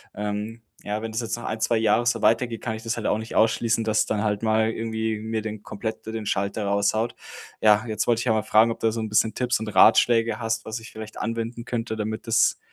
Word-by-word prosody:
ähm, 105 +2 -4 0.2
ja, 105 +1 -3
wenn 115 0 -5
das 110 +2 -2
jetzt 115 - -3
noch 120 - -8
1, 110 - -3
2 115 +1 +2
Jahre 110 +2 +2
so 115 -2 +1
weitergeht, 115 0 +2
kann 110 -3 -3
ich 110 - -9
das 115 +1 -2
halt 110 - -2
auch 105 - +2
nicht 110 +1 -7
ausschließen, 115 +1 +2
dass 110 -1 +2
dann 105 0 -1
halt 105 0 -1
mal 110 0 +2
irgendwie 110 -1 -2
mir 110 0 -3
den 110 -1 -6
komplett 110 +2 -5
den 110 -1 -5
Schalter 100 +2 -1
raushaut. 100 +4 +1 0.5
Ja, 105 +1 +5
jetzt 110 0 -1
wollte 115 -1 +3
ich 120 - -3
ja 110 - +3
mal 110 -2 0
fragen, 110 +1 +4
ob - - -6
du 115 -1 +1
so 115 - -4
'n 110 - -4
bisschen 110 +1 +2
Tipps 125 -3 0
und 110 - -5
Ratschläge 115 +2 +4
hast, 115 0 -2
was 110 +1 -4
ich 110 - -12
vielleicht 110 0 -9
anwenden 115 +1 -4
könnte, 115 -2 -3
damit 110 +2 -4
das 115 +1 +3
110 Hz, 245 wpm, -24 LUFS, 110-115 Hz, 0.5 s, Ja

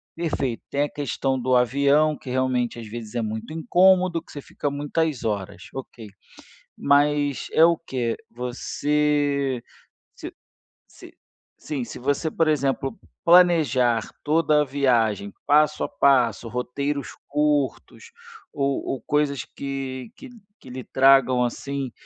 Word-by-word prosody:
perfeito, 140 -8 -2
tem 140 - 0
a 145 - -2
questão 135 -2 -2
do 125 +1 +1
avião, 140 +5 +3
que, 130 - -11
realmente, 125 -2 0
às 115 - -8
vezes, 110 -1 -8
é 120 - 0
muito 110 +7 -5
incômodo, 180 -1 +3
que - - -17
você 145 - -7
fica 145 - -4
muitas 145 -1 -2
horas, 100 -5 -3
ok, 120 -4 -8 0.7
mas 145 0 +2
é 160 - +6
o 170 0 +4
quê? 125 -7 -3 0.2
Você, 140 - -1 0.5
se - - -8 0.6
se - - -15 0.5
sim, 145 -4 -4
se - - -9
você, 145 +5 -1
por 165 0 +1
exemplo, 135 -2 0 0.3
planejar 155 - +4 0.2
toda 150 -1 +3
a - - 0
viagem 115 -7 +1
passo 150 +1 +3
a - - -3
passo, 120 -4 +2
roteiros 140 +4 -3 0.2
curtos 150 - -1 0.4
ou 140 -1 -1
ou 130 -4 -3
coisas 145 -3 0
que 135 +1 -6
que 275 - -11 0.3
que - - -13
lhe 130 +1 -6
tragam, 130 -2 +4
assim, 135 +1 -4
140 Hz, 135 wpm, -23 LUFS, 125-150 Hz, 0.7 s, é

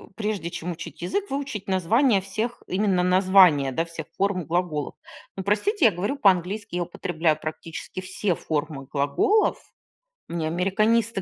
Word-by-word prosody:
прежде 210 -6 -2
чем 175 +2 -4
учить 170 0 -9
язык, 400 - -2
выучить 275 -8 -4
названия 200 - +3
всех, 215 +5 -4
именно 185 -1 +1
названия, 180 -6 +5
да, 165 +6 -1
всех 165 -2 -8
форм 195 -4 0
глаголов. 165 -4 -2 0.4
Ну, 190 - -3
простите, 255 - +1
я 225 - +7
говорю 200 +10 -2
по-английски, 195 -1 +1
я 175 - 0
употребляю 165 -2 -1
практически 165 +3 -6
все 185 0 -1
формы 150 -3 -3
глаголов. 395 - +1 0.7
Мне 165 -2 -2
американисты 205 +5 +1
185 Hz, 140 wpm, -25 LUFS, 165-210 Hz, 0.7 s, я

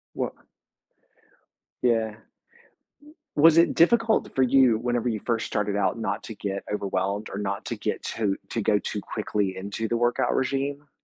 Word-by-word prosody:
Wa - - -1 1.5
Yeah. 110 -3 +1 1.2
Was 165 +2 +7
it 170 - +4
difficult 225 +6 +3
for 130 - +2
you 130 -3 +5
whenever- 120 0 -1
you 110 -3 -2
first 115 -2 -1
started 105 -1 -1
out- 95 +1 +1
not 100 -3 -3
to 110 - -7
get 100 -1 -4
overwhelmed 100 +1 -2
or 100 - -5
not 100 -1 -3
to - - -3
get - - -3
too 105 -3 -1
to 115 - -1
go 105 0 +3
too 105 - -4
quickly 100 -2 -2
into 100 +4 -4
the 120 - 0
workout 120 +1 +1
regime? 140 +2 -1
110 Hz, 160 wpm, -26 LUFS, 100-125 Hz, 1.5 s, Was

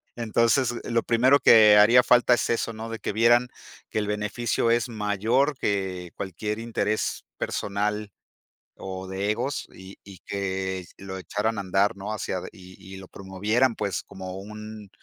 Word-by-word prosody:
Entonces, 115 +2 +1
lo 115 -1 0
primero 130 +4 +4
que 105 -2 +7
haría 115 +4 +7
falta 125 0 +4
es - - -2
eso, 115 0 0
¿no? 110 +1 -7
De 115 - -6
que - - -3
vieran 120 +3 +4 0.4
que - - -1
el 105 - -2
beneficio 105 +3 -1
es 120 +2 +1
mayor 110 +7 0
que 95 -5 -2
cualquier 105 +3 -4
interés 115 -2 -2
personal 105 +1 -2 0.7
o 95 0 -7
de 95 +2 -3
egos, 130 +5 -3
y 95 +1 -12
y 95 -2 -13
que 95 -2 -3
lo 95 -1 -7
echaran 105 +4 -2
a - - -1
andar, 100 +3 +1
¿no? 100 +2 -5
Hacia 100 -3 -3
ade 90 - -6
y 95 0 -14 0.2
y - - -9
lo 95 -1 -11
promovieran, 105 +6 0
pues, 100 -2 -2
como 95 0 -8
un 105 0 -9
105 Hz, 165 wpm, -25 LUFS, 95-115 Hz, 0.7 s, que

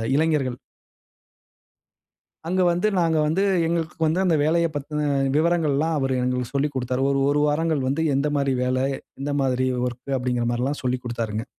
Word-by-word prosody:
இளைஞர்கள். 145 -5 +1 1.9
அங்க 185 +1 +1
வந்து 180 +5 +1
நாங்க 165 -2 +2
வந்து 170 +6 +1 0.2
எங்களுக்கு 165 0 -2
வந்து 175 +5 +1
அந்த 170 -4 +3
வேலையப் 165 0 +1
பத்தின 150 +1 -2 0.3
விவரங்கள்லாம் 160 -1 +1
அவரு 135 -1 0
எங்களுக்கு 125 0 -2
சொல்லிக் 140 0 0
குடுத்தாரு. 130 0 -1
ஒரு 140 - +1
1 145 +1 +2
வாரங்கள் 150 -3 0
வந்து 160 +4 0
எந்த 145 +2 0
மாரி 135 -1 +1
வேல 130 0 0 0.4
எந்த 145 +1 -2
மாதிரி 130 -1 +1 0.2
வொர்க்கு 125 +3 -6
அப்படிங்கிற 125 -1 -1
மாரில்லாம் 130 +5 -2
சொல்லிக் 125 0 -1
குடுத்தாருங்க. 115 -2 -3
145 Hz, 150 wpm, -23 LUFS, 125-160 Hz, 1.9 s, அந்த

